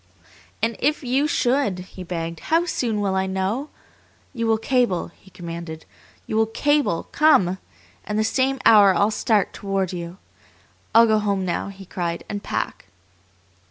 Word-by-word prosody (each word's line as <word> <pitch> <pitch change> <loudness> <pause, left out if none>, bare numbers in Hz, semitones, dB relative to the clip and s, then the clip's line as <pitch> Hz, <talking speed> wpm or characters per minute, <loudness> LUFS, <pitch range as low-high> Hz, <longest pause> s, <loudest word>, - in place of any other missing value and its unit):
"And 230 0 0
if 300 0 0
you 265 +4 +1
should!" 250 -8 +1
he 185 - -10
begged. 165 -2 -4
"How 330 +2 +3
soon 230 -10 -1
will 195 -2 0
I 190 0 0
know? 190 +10 -2 0.6
You 230 -3 -2
will 225 0 +3
cable," 235 -7 0
he 190 - -20
commanded. 170 -3 -8 0.4
"You 215 - -2
will 220 0 +3
cable 290 - +1
'Come,' 190 - +4 0.4
and 210 - -3
the 215 - +2
same 265 +4 +1
hour 200 -4 +7
I'll 205 +2 +2
start 215 -1 +1
toward 195 -2 -2
you. 170 0 -6 0.8
I'll 230 +1 +8
go 220 -1 +3
home 200 -2 -1
now," 175 +2 -2
he 195 -1 -10
cried, 170 -2 -4
"and 205 -1 -4
pack!" - - -4
205 Hz, 160 wpm, -22 LUFS, 185-240 Hz, 0.8 s, I'll